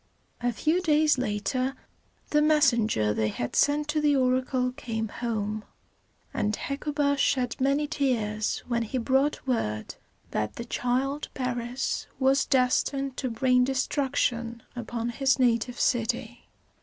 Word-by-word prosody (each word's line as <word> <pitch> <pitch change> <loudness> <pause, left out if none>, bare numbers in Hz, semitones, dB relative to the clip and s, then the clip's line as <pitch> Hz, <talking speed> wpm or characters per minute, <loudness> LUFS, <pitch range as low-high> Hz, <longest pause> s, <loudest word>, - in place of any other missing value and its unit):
A 245 0 +1
few 315 +9 +1
days 305 -4 +3
later 255 +4 -1 0.6
the 300 - +4
messenger 235 - +3
they 110 0 0
had 120 +3 -4
sent 295 +1 +3
to 305 0 +1
the 295 -1 +3
oracle 255 -1 +1
came 225 -3 -4
home, 215 -2 -3 0.7
and 210 -2 0
Hecuba 285 0 -1
shed 255 -3 +1
many 280 +3 +2
tears 230 -8 -1
when 235 -1 0
he 230 +3 -3
brought 265 +5 +1
word 105 - -2 0.4
that 105 0 -2
the 235 - -6
child 260 +4 -1
Paris 245 -1 -2
was 270 +1 +3
destined 270 0 +1
to 260 - -2
bring 250 +2 +3
destruction 250 -3 -1
upon 235 -1 -3
his 265 +2 +2
native 245 -1 +1
city. 240 -1 -1
250 Hz, 130 wpm, -27 LUFS, 230-275 Hz, 0.7 s, the